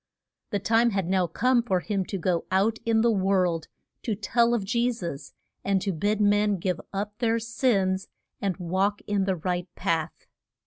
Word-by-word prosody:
The 205 Hz, -, 0 dB
time 225 Hz, +4 st, +3 dB
had 195 Hz, -5 st, -1 dB
now 185 Hz, -1 st, +2 dB
come 245 Hz, +8 st, +2 dB
for 190 Hz, -6 st, 0 dB
him 195 Hz, 0 st, -2 dB
to 195 Hz, -, -4 dB
go 175 Hz, -1 st, 0 dB
out 205 Hz, +4 st, +2 dB
in 225 Hz, -1 st, +3 dB
the 235 Hz, 0 st, +4 dB
world 185 Hz, -5 st, +1 dB, 0.3 s
to 220 Hz, -, -2 dB
tell 235 Hz, +3 st, +2 dB
of 220 Hz, -, -1 dB
Je 240 Hz, +3 st, +1 dB
sus, 170 Hz, -, -6 dB, 0.3 s
and 195 Hz, -1 st, +2 dB
to 200 Hz, -, 0 dB
bid 205 Hz, +6 st, 0 dB
men 205 Hz, 0 st, +3 dB
give 180 Hz, 0 st, -2 dB
up 205 Hz, +1 st, -3 dB
their 230 Hz, -1 st, +2 dB
sins 210 Hz, -5 st, 0 dB, 0.3 s
and 195 Hz, -3 st, -1 dB
walk 190 Hz, +3 st, 0 dB
in 200 Hz, -2 st, 0 dB
the 190 Hz, -1 st, +1 dB
right 180 Hz, +1 st, -2 dB
path. 160 Hz, -2 st, -2 dB
200 Hz, 180 wpm, -26 LUFS, 185-225 Hz, 0.3 s, the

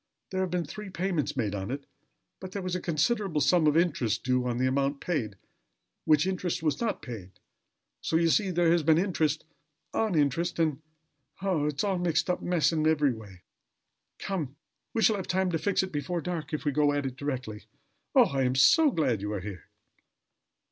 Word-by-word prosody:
There 190 Hz, 0 st, -1 dB
have 185 Hz, -, 0 dB
been 175 Hz, -1 st, -1 dB
three 210 Hz, +7 st, -8 dB
payments 170 Hz, -6 st, -2 dB
made 105 Hz, -5 st, 0 dB
on 95 Hz, -1 st, -4 dB
it: 140 Hz, +2 st, -4 dB, 0.5 s
but 185 Hz, 0 st, -8 dB
there 200 Hz, -, -4 dB
was 180 Hz, -1 st, -2 dB
a 180 Hz, -, -2 dB
considerable 180 Hz, +1 st, 0 dB
sum 160 Hz, +2 st, +4 dB
of 150 Hz, +1 st, +4 dB
interest 145 Hz, -, +1 dB
due 125 Hz, -1 st, +1 dB
on 120 Hz, -1 st, -1 dB
the 130 Hz, -, +1 dB
amount 140 Hz, +2 st, 0 dB
paid, 125 Hz, -, -2 dB, 0.7 s
which 155 Hz, +1 st, +4 dB
interest 185 Hz, -3 st, -2 dB
was 155 Hz, -, 0 dB
not 230 Hz, -2 st, -1 dB
paid. 100 Hz, -8 st, -8 dB, 0.7 s
So, -, -, -1 dB
you 165 Hz, 0 st, +4 dB
see, 195 Hz, +3 st, +2 dB
there 175 Hz, -2 st, +3 dB
has 170 Hz, 0 st, +3 dB
been 155 Hz, +1 st, +4 dB
interest 160 Hz, -5 st, 0 dB, 0.5 s
on 220 Hz, -5 st, 0 dB
interest, 155 Hz, +4 st, +1 dB
and 155 Hz, -3 st, 0 dB, 0.6 s
Oh! 170 Hz, -7 st, +1 dB
it 150 Hz, -, -2 dB
is 145 Hz, -, -1 dB
a 195 Hz, -3 st, 0 dB
mixed 175 Hz, 0 st, +1 dB
up 180 Hz, -, -3 dB
mess 175 Hz, -3 st, +2 dB
in 155 Hz, -1 st, +1 dB
every 150 Hz, -4 st, +3 dB
way. 100 Hz, -5 st, -12 dB, 0.7 s
Come; 155 Hz, -9 st, -4 dB, 0.4 s
we 225 Hz, -, +2 dB
shall 220 Hz, -, +4 dB
have 190 Hz, -, -5 dB
time 185 Hz, 0 st, +1 dB
to 165 Hz, -, 0 dB
fix 200 Hz, +2 st, +1 dB
it 190 Hz, -, -5 dB
before 170 Hz, +4 st, -2 dB
dark, 170 Hz, -1 st, -4 dB
if 155 Hz, 0 st, -3 dB
we 145 Hz, -, +2 dB
go 145 Hz, +1 st, +2 dB
at 145 Hz, -1 st, -1 dB
it 130 Hz, -1 st, -4 dB
directly. 130 Hz, -6 st, -5 dB, 0.5 s
Oh! -, -, +8 dB
I 135 Hz, -1 st, -1 dB
am 130 Hz, 0 st, +1 dB
so 310 Hz, -, +6 dB
glad 140 Hz, -, 0 dB
you 105 Hz, +1 st, -3 dB
are 105 Hz, -, -2 dB
here!" 95 Hz, -2 st, -8 dB
155 Hz, 205 wpm, -28 LUFS, 135-180 Hz, 0.7 s, Oh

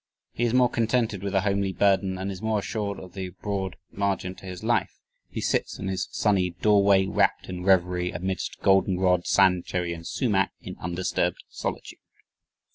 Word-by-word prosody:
He 120 Hz, -, -1 dB
is 120 Hz, -, 0 dB
more 125 Hz, -1 st, +6 dB
contented 115 Hz, -3 st, 0 dB
with 100 Hz, 0 st, -3 dB
a 95 Hz, -, +4 dB
"homely 100 Hz, -1 st, 0 dB
burden" 95 Hz, -1 st, +2 dB
and 95 Hz, +1 st, -3 dB
is 95 Hz, -, -7 dB
more 110 Hz, -1 st, 0 dB
assured 100 Hz, -1 st, -3 dB
of 90 Hz, -1 st, -11 dB
"the 95 Hz, -2 st, -5 dB
broad 100 Hz, -2 st, -3 dB, 0.2 s
margin 95 Hz, -2 st, -1 dB
to 95 Hz, -, -12 dB
his 90 Hz, -1 st, -7 dB
life; -, -, 0 dB, 0.3 s
he -, -, -5 dB
sits -, -, 0 dB
in 95 Hz, -, -4 dB
his 95 Hz, -1 st, -2 dB
sunny 95 Hz, -4 st, +1 dB
doorway... 100 Hz, -2 st, +4 dB
rapt 100 Hz, 0 st, +1 dB
in 90 Hz, -1 st, -5 dB
revery... 90 Hz, -1 st, +2 dB
amidst 95 Hz, +1 st, -4 dB
goldenrod, 95 Hz, -2 st, +3 dB
sandcherry, 90 Hz, -2 st, +2 dB
and 85 Hz, 0 st, -8 dB
sumac... 100 Hz, -7 st, +1 dB
in -, -, -8 dB
undisturbed 90 Hz, 0 st, -1 dB
solitude." -, -, -5 dB
95 Hz, 170 wpm, -26 LUFS, 90-100 Hz, 0.3 s, more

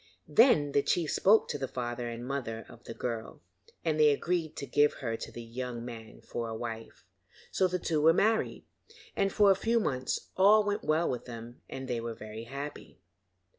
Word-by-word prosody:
Then 155 Hz, -, +5 dB
the 140 Hz, -, +3 dB
chief 165 Hz, +1 st, 0 dB
spoke 215 Hz, +3 st, +4 dB
to 145 Hz, -, -3 dB
the 135 Hz, -, -2 dB
father 120 Hz, -1 st, -4 dB
and 115 Hz, 0 st, -6 dB
the -, -, -7 dB
mother 115 Hz, -5 st, -4 dB
of -, -, -15 dB
the -, -, -6 dB
girl, 115 Hz, -6 st, -5 dB, 0.4 s
and 155 Hz, -2 st, +1 dB
they 150 Hz, -1 st, +7 dB
agreed 160 Hz, +2 st, 0 dB
to 140 Hz, -, -5 dB
give 145 Hz, +1 st, +3 dB
her 115 Hz, -4 st, -3 dB
to -, -, -7 dB
the 120 Hz, -, -8 dB
young 120 Hz, 0 st, -5 dB
man 115 Hz, -2 st, -9 dB
for 115 Hz, -1 st, -4 dB
a 110 Hz, -, -4 dB
wife. 115 Hz, -1 st, -7 dB, 0.5 s
So 190 Hz, -, +3 dB
the 180 Hz, 0 st, -1 dB
two 160 Hz, -3 st, 0 dB
were 160 Hz, +2 st, +7 dB
married, 220 Hz, +6 st, +1 dB, 0.5 s
and 195 Hz, 0 st, +1 dB
for 205 Hz, -1 st, +5 dB
a -, -, +5 dB
few 230 Hz, +4 st, +1 dB
months 130 Hz, -, -2 dB
all 210 Hz, +3 st, +6 dB
went 205 Hz, 0 st, -1 dB
well 160 Hz, +2 st, +2 dB
with 125 Hz, -, -3 dB
them 120 Hz, 0 st, -9 dB
and 130 Hz, 0 st, -6 dB
they 120 Hz, -2 st, -2 dB
were 115 Hz, -1 st, -5 dB
very 110 Hz, +1 st, -8 dB
happy. 140 Hz, +4 st, -7 dB
135 Hz, 205 wpm, -30 LUFS, 120-165 Hz, 0.5 s, they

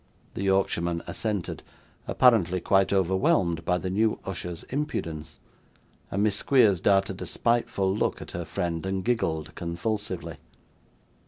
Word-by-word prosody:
The -, -, -5 dB
Yorkshireman 85 Hz, -3 st, +1 dB
assented 105 Hz, -5 st, -3 dB, 0.5 s
apparently 95 Hz, -8 st, +4 dB
quite 95 Hz, +2 st, +2 dB
overwhelmed 95 Hz, -3 st, +2 dB
by 90 Hz, +1 st, +1 dB
the 90 Hz, 0 st, -3 dB
new 110 Hz, +3 st, +2 dB
usher's 90 Hz, -3 st, -5 dB
impudence 85 Hz, -, -3 dB, 0.7 s
and 100 Hz, +2 st, 0 dB
Miss 105 Hz, -2 st, +2 dB
Squeers 110 Hz, -10 st, +4 dB
darted 95 Hz, 0 st, +2 dB
a -, -, -4 dB
spiteful 100 Hz, -5 st, +1 dB
look -, -, 0 dB
at -, -, -8 dB
her 85 Hz, -, -4 dB
friend, 85 Hz, +2 st, -3 dB
and 95 Hz, -1 st, -2 dB
giggled 80 Hz, -10 st, -1 dB
convulsively. 90 Hz, +5 st, -3 dB
95 Hz, 130 wpm, -27 LUFS, 85-105 Hz, 0.7 s, apparently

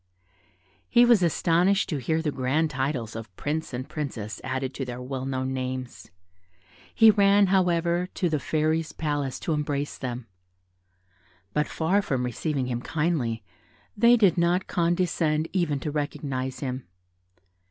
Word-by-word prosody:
He 240 Hz, 0 st, +6 dB
was 235 Hz, -5 st, +5 dB
astonished 175 Hz, +3 st, +2 dB
to 150 Hz, -, -1 dB
hear 160 Hz, +6 st, 0 dB
the 150 Hz, -, 0 dB
grand 140 Hz, +4 st, 0 dB
titles 130 Hz, -5 st, -2 dB
of 110 Hz, -5 st, -8 dB
prince 155 Hz, -, -3 dB
and 130 Hz, +1 st, -5 dB
princess 120 Hz, -8 st, -5 dB
added 130 Hz, 0 st, -3 dB
to 135 Hz, -, -4 dB
their 125 Hz, -1 st, -6 dB
well 130 Hz, +1 st, -4 dB
known 130 Hz, 0 st, -2 dB
names, 130 Hz, -1 st, -5 dB, 0.9 s
he 225 Hz, -1 st, +8 dB
ran, 200 Hz, -1 st, +5 dB
however, 175 Hz, -1 st, +2 dB
to 180 Hz, -, +1 dB
the 155 Hz, -3 st, 0 dB
Fairy's 155 Hz, +3 st, 0 dB
palace 145 Hz, -4 st, -2 dB
to 165 Hz, -, -1 dB
embrace 145 Hz, -1 st, -2 dB
them; 125 Hz, -2 st, -4 dB, 1.3 s
but 150 Hz, -, +1 dB
far 180 Hz, +6 st, +1 dB
from 130 Hz, -10 st, -1 dB
receiving 135 Hz, +3 st, -2 dB
him 120 Hz, -1 st, -3 dB
kindly, 140 Hz, -9 st, -1 dB, 0.5 s
they 235 Hz, +3 st, +6 dB
did 195 Hz, -6 st, +4 dB
not 175 Hz, +2 st, +2 dB
condescend 170 Hz, -3 st, +1 dB
even 170 Hz, -7 st, +1 dB
to 150 Hz, -, -3 dB
recognise 135 Hz, -3 st, -3 dB
him. 130 Hz, -4 st, -4 dB
150 Hz, 140 wpm, -26 LUFS, 130-170 Hz, 1.3 s, he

